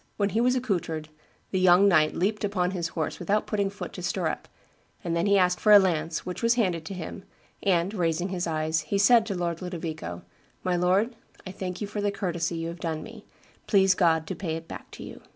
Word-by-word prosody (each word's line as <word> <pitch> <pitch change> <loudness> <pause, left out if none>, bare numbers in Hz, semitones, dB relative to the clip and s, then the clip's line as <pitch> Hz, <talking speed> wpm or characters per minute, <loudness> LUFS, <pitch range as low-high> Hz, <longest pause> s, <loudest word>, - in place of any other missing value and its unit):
When 200 -1 +1
he 220 +3 +1
was 250 +1 +3
accoutred, 175 -10 -2 0.4
the 190 - +1
young 185 +2 +6
knight 155 -5 +4
leaped 210 +4 0
upon 185 -3 0
his 175 -3 -2
horse 160 -1 -4
without 205 +4 0
putting 200 -2 0
foot 200 - -8
to - - -7
stirrup; - - -2 0.6
then 170 +2 0
he 200 0 +5
asked 180 -1 +2
for 215 - +3
a 205 - +11
lance, 170 -4 0
which 180 - -5
was 230 0 +3
handed 180 -9 0
to 195 - -6
him, 185 +2 -7 0.4
and, 185 0 +1
raising 175 -1 0
his 180 -2 -2
eyes, 160 0 0
he 200 - -2
said 225 +2 +5
to 200 - -2
Lord 170 -1 -2
Ludovico, 160 - -5 0.4
'My 180 -1 +1
lord, 190 +7 +2 0.3
I 185 - -6
thank 185 0 -5
you - - -1
for 205 0 -4
the 205 - +1
courtesy 175 -4 -2
you 165 0 -3
have 170 +1 -8
done 160 -2 -3
me; - - -11 0.4
please 195 -2 +5
God 165 -3 +2
to 190 - -5
pay 165 -2 -3
it 165 0 -7
back - - -9
to - - -10
you. - - -10
180 Hz, 220 wpm, -27 LUFS, 165-200 Hz, 0.6 s, a